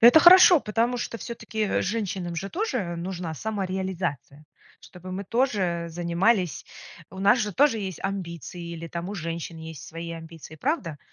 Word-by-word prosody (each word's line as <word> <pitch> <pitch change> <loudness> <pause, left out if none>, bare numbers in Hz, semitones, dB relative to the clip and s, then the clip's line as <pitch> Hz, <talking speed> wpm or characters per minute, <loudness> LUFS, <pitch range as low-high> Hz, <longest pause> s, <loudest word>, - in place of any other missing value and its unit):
Это 245 +7 +9
хорошо, 355 -1 +9
потому 230 +3 0
что 235 -1 -4
всё-таки, 230 -2 -6
э, 210 - +1
женщинам 190 -5 -2
же 195 +4 -3
тоже 255 - -2
нужна 175 -1 -4
самореализация, 185 - -3 0.4
чтобы 180 0 -11
мы 195 +2 -4
тоже 190 -7 0
занимались 175 +2 +1 0.5
у 190 - -10
нас 200 +6 +5
же 210 -3 -1
тоже 275 - +4
есть 190 -5 -5
амбиции, 175 -2 -5
или 165 0 -6
там 170 +2 -5
у 205 - -5
женщин 165 -2 -4
есть 160 -3 -9
свои 165 +1 -6
амбиции, 160 -1 -10
правда? 180 - -2
185 Hz, 155 wpm, -26 LUFS, 170-220 Hz, 0.5 s, Это